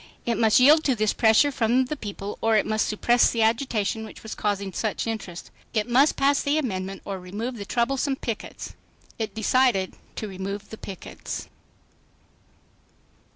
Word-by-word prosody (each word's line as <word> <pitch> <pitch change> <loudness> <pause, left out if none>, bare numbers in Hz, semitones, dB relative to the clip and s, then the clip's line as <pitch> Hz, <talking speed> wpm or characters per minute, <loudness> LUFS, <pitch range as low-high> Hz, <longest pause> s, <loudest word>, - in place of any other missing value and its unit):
It 235 -2 0
must 220 0 +5
yield 300 +5 +6
to 265 - +3
this 215 -1 +1
pressure 225 +6 +4
from 255 0 +2
the 305 - -4
people 205 -5 -6
or 225 0 +3
it 210 - +3
must 215 0 0
suppress 240 +3 +3
the 230 -2 +1
agitation 225 -2 0
which 220 - -11
was 220 - -6
causing 200 -2 -2
such 215 +2 -2
interest. 200 -6 -5 0.2
It 215 0 +1
must 265 +5 +4
pass 280 +1 +3
the 285 +1 +1
amendment 195 -8 -3
or 195 -1 -4
remove 215 +7 -5
the 200 - -6
troublesome 270 +5 0
pickets. 230 -4 -6 0.5
It 220 - -3
decided 220 -3 +2 0.2
to 215 - -4
remove 195 +1 -6
the 220 - -7
pickets. 190 -3 -7
220 Hz, 160 wpm, -25 LUFS, 205-250 Hz, 0.5 s, yield